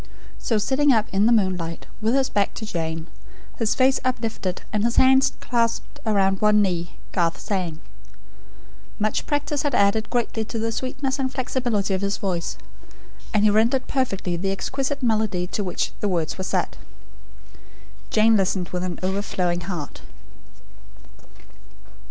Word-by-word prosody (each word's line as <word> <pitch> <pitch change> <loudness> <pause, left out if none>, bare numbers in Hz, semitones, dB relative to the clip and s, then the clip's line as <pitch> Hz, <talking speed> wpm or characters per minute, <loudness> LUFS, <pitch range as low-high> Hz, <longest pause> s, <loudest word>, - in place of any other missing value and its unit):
So 225 - 0
sitting 270 +7 +3
up; 220 -4 +3
in 200 +2 +3
the - - +4
moonlight, 185 -6 0 0.2
with 225 +4 +2
his 270 -1 +3
back 200 -1 0
to 220 - -5
Jane, 160 -4 -3 0.5
his 225 -2 +1
face 260 0 +4
uplifted, 225 -7 -2
and 210 -1 +1
his 235 0 +1
hands 265 +1 +5
clasped 230 -2 -1
around 195 -2 +2
one 210 0 +5
knee, 175 -4 0 0.2
Garth 170 -2 0
sang. 180 -6 -2 1.2
Much 215 0 -1
practice 290 0 0
had 290 - 0
added 200 +2 +3
greatly 235 -2 -1
to 225 +1 -5
the 225 +1 -1
sweetness 265 +3 -2
and 260 -1 0
flexibility 245 -7 -1
of 190 - 0
his 200 0 0
voice; 180 -4 -2 0.7
and 210 -2 +2
he 210 - +5
rendered 230 +5 +3
perfectly 195 -10 -1
the 190 +3 -1
exquisite 270 +7 -2
melody 215 -6 +1
to 205 +3 -3
which 180 - -2
the 205 - 0
words 170 -4 -1
were 190 - -4
set. - - -1 1.3
Jane 220 +1 +5
listened 185 -2 +1
with 180 0 -3
an 180 -1 -3
overflowing 185 -2 -1
heart. 170 -5 -5
210 Hz, 150 wpm, -23 LUFS, 185-240 Hz, 1.3 s, hands